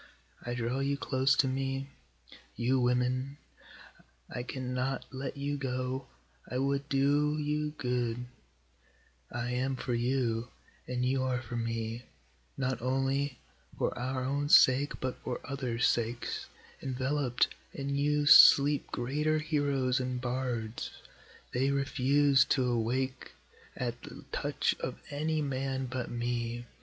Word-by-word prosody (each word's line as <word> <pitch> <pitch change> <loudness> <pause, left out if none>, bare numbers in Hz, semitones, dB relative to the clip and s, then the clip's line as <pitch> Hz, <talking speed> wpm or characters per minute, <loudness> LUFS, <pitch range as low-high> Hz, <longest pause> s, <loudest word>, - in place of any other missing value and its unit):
I 120 0 -3
draw 120 +2 -1
you 140 +1 0
close 135 -1 +2
to 135 - +3
me, 135 +1 -2 0.7
you 130 +2 +2
women, 125 +2 +1 0.9
I 125 - -3
cannot 130 +1 -3
let 135 +1 -5
you 145 +1 -2
go, 130 -1 -3 0.4
I 125 - -2
would 140 +2 0
do 145 +2 +2
you 150 0 -1
good, 125 -1 -1 1.1
I 120 0 -3
am 130 +2 0
for 125 0 -3
you, 120 -1 0 0.4
and 125 0 -1
you 130 +1 +1
are 130 -1 0
for 120 -1 -7
me, 115 0 -2 0.6
not 130 -3 -1
only 135 +1 0 0.4
for - - 0
our 130 +1 -2
own 140 +2 -1
sake, 135 0 +6
but 130 -1 -3
for 125 - -3
othersŌĆÖ 125 -4 -3
sakes, 120 0 0 0.3
EnvelopŌĆÖd 130 -1 +1 0.3
in 140 0 -3
you 145 +1 +2
sleep 145 0 +8
greater 150 +6 0
heroes 140 -4 +1
and 125 -1 -2
bards, 120 -3 -3 0.6
They 130 +2 +2
refuse 140 0 +3
to 130 -2 +2
awake 125 +2 -1 0.4
at 120 -1 -3
the - - -11
touch - - 0
of - - -4
any 155 +2 0
man 135 -1 -2
but 125 -1 -4
me. 120 0 -2
130 Hz, 130 wpm, -31 LUFS, 125-140 Hz, 1.1 s, sleep